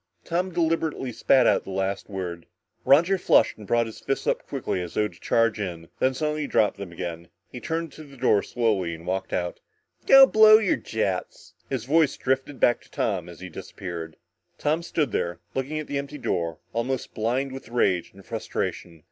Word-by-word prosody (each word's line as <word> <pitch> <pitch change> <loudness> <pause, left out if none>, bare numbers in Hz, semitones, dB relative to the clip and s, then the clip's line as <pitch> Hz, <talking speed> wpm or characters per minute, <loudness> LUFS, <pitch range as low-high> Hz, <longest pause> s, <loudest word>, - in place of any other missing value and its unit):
Tom 180 +2 -1
deliberately 165 -5 0
spat 130 +2 +4
out - - +3
the - - -10
last 95 +1 -2
word. 90 -4 -5 0.4
Roger 170 +7 +5
flushed - - +4
and 105 - -11
brought 120 +2 +2
his 110 - -9
fists 135 - -2
up - - -1
quickly 90 - -2
as 90 -2 -7
though 105 - +2
to 85 -5 -17
charge 115 +2 +2
in, 85 -4 -5
then 130 0 +2
suddenly 150 +1 -1
dropped 105 -6 +2
them 100 -3 -7
again. 85 0 -6 0.2
He 125 - -7
turned 165 +3 -3
to 155 - -11
the 140 -2 -15
door 110 - +4
and - - -2
slowly 100 -8 0
walked 90 +3 -4
out. 90 -1 -2 0.5
"Go 270 0 +10
blow 215 -3 +8
your 215 -4 +2
jets," 100 -5 -3 0.2
his 130 -4 -3
voice 155 +1 +3
drifted 135 +1 -1
back 120 - +3
to - - -21
Tom 95 -5 -2
as 85 0 -12
he 95 - -7
disappeared. 85 -1 -7 0.4
Tom 155 +3 0
stood 155 -6 -1
there, 85 -3 -2
looking 135 +4 -2
at 155 - -3
the 140 -1 -2
empty 140 +1 -6
door, 85 - -2 0.2
almost 120 +3 -2
blind 125 +5 -1
with 135 -3 -9
rage 95 -7 +1
and 100 0 -16
frustration. 85 -2 -4
115 Hz, 190 wpm, -25 LUFS, 95-145 Hz, 0.5 s, Go